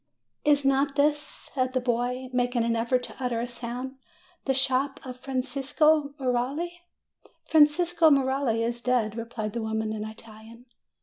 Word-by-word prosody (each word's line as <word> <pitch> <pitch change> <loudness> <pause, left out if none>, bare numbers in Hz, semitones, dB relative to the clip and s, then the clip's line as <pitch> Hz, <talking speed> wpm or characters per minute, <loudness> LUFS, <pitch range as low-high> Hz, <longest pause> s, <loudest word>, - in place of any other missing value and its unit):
"Is 290 -1 +3
not 275 +1 +2
this," 295 +1 +3
said 255 -3 -4
the 255 - +2
boy, 250 +1 -1
making 245 -1 +1
an 230 0 +1
effort 240 +2 +1
to - - -7
utter 245 -2 0
a 240 - -2
sound, 245 +2 -6 0.5
"the 270 - +2
shop 270 +2 +1
of 255 -1 -8
Francesco 275 +3 +1
Merelli?" 275 +7 -1 0.7
"Francesco 325 +2 +4
Merelli 265 -4 +2
is 235 +1 -2
dead," 240 -4 +1
replied 230 -2 -4
the 235 - -2
woman 220 0 -2
in 215 -1 -4
Italian. 220 +2 -11
255 Hz, 145 wpm, -27 LUFS, 235-280 Hz, 0.7 s, Francesco